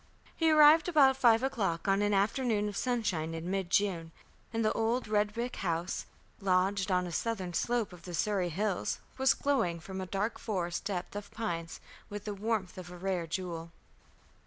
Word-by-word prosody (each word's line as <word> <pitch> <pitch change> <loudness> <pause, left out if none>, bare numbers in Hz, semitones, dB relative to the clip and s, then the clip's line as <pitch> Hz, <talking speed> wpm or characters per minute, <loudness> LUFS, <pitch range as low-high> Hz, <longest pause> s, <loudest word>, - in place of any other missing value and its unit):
He 325 -1 +2
arrived 310 +1 +7
about 275 -5 +5
five 235 -2 +4
o'clock 200 -12 -1
on 195 +1 +3
an 205 0 +2
afternoon 210 +1 +1
of 205 - -5
sunshine 195 -11 -1
in 165 +3 -4
mid 195 -2 -1
June, 175 -5 +1 0.4
and 225 -1 0
the 215 - +2
old 230 +2 0
red 210 -1 +1
brick 240 +2 -3
house, 170 -1 -2 0.3
lodged 190 +1 +1
on 180 -1 +2
a 175 - -5
southern 185 +1 -2
slope 235 +1 0
of 175 - -12
the 175 0 -6
Surrey 195 -1 0
hills, 195 +3 -1 0.2
was 265 0 +4
glowing 230 -13 0
from 190 +3 -6
a 185 - -5
dark 200 +4 -2
forest 175 -5 -3
depth 195 -1 -3
of 205 -1 -6
pines 175 -7 -4 0.3
with 205 0 -7
the 210 - -3
warmth 200 -3 -2
of 175 -1 -9
a 180 - -9
rare 180 -2 -2
jewel. 170 -1 -4
200 Hz, 185 wpm, -31 LUFS, 180-225 Hz, 0.4 s, arrived